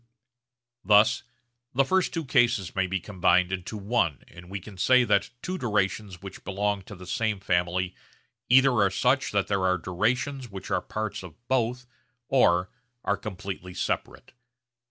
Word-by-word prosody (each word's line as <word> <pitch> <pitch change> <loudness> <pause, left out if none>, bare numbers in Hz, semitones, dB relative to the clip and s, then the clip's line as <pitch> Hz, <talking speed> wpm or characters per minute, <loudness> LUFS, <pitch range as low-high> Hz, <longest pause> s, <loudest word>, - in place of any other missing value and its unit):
Thus 105 +1 +5 0.5
the 135 +1 +4
first 190 +4 +2
two 165 -2 -3
cases 120 - +2
may 95 -1 +1
be 95 +1 -1
combined 90 -1 +2
into 95 +3 -4
one 100 - 0
and 90 0 -13
we 100 +1 -4
can 100 +2 -12
say 125 +7 +4
that 100 -4 +2
two 185 0 -3
durations 100 -4 -1
which 95 -1 -9
belong 100 0 -1
to 100 - -9
the 90 0 -11
same 105 +2 -1
family 90 0 0 0.6
either 130 +2 +6
are 105 -5 +3
such 125 +8 +1
that 100 -2 +1
there 100 -2 0
are 90 0 +3
durations 125 +9 -1
which 100 -2 -8
are - - +1
parts 110 -1 -4
of 90 -5 -11
both 125 -1 0 0.4
or 90 -9 +3 0.3
are 100 - +1
completely 95 -2 -7
separate. - - -3
100 Hz, 155 wpm, -27 LUFS, 95-120 Hz, 0.6 s, either